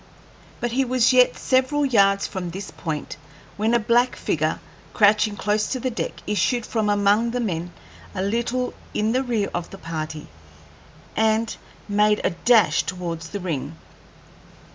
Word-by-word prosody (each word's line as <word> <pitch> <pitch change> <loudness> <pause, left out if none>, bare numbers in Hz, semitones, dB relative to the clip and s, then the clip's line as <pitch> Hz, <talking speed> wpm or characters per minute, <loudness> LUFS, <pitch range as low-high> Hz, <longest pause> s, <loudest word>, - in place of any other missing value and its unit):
But 240 - -2
he 265 +3 +2
was 255 -1 +3
yet 250 0 +5
several 270 +3 +1
yards 200 -6 +3
from 185 -3 -4
this 190 +3 -7
point 155 -4 -5 0.4
when 220 +3 +1
a - - +4
black 240 +3 +2
figure, 155 0 -1 0.4
crouching 210 0 +4
close 210 +1 0
to 260 - -2
the 255 +1 -2
deck, 195 -7 -4
issued 210 +4 0
from 220 -2 -1
among 205 +3 +3
the 245 +1 -2
men, 175 -6 -2 0.4
a 185 - -1
little 235 +4 -1 0.2
in 215 +1 +1
the 255 +2 +2
rear 230 -6 -1
of 175 -1 -3
the 195 - -10
party, 155 -3 -5 0.9
and 220 +1 +1 0.3
made 210 0 +3
a - - +2
dash 180 -3 +4
towards 170 -3 -5
the 205 - -5
ring. 160 -4 -4
210 Hz, 155 wpm, -23 LUFS, 180-235 Hz, 0.9 s, yet